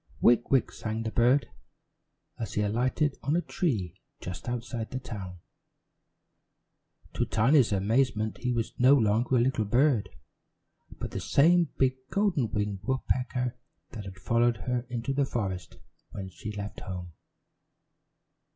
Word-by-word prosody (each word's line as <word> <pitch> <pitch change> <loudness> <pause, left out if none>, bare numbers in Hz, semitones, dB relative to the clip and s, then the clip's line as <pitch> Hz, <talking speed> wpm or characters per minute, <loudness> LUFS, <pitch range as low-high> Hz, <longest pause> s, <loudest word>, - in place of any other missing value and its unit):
"Wick 120 0 +4
wick!" 135 -3 +3
sang 110 0 -4
the 110 - -3
bird, 125 +5 +3 0.9
as 115 - -4
he 105 - +2
alighted 130 +7 0
on 145 - 0
a 175 - +2
tree 110 - -2 0.2
just 90 +6 -6
outside 120 -1 -4
the 130 - -4
town. 100 -8 -7 1.8
To - - 0
Tiny's 125 +2 +3
amazement, 110 +2 +1
he 125 0 -1
was 115 -2 -1
no 130 +3 +7
longer 115 +1 +2
a - - +5
little 120 -2 +2
bird, 120 +1 +2 0.9
but - - -5
the - - -3
same 170 +2 +4
big 130 -1 +2
golden 190 - +1
winged 105 -2 -1
woodpecker 125 -1 -1 0.4
that 110 -4 -7
she - - -5
had 95 - -13
followed 115 +4 +2 0.3
into 120 +2 -2
the 140 +1 +2
forest 95 -8 -3 0.3
when 95 -1 -6
she 105 +3 -7
left 105 0 -6
home. 90 -2 -7
120 Hz, 140 wpm, -28 LUFS, 105-130 Hz, 1.8 s, no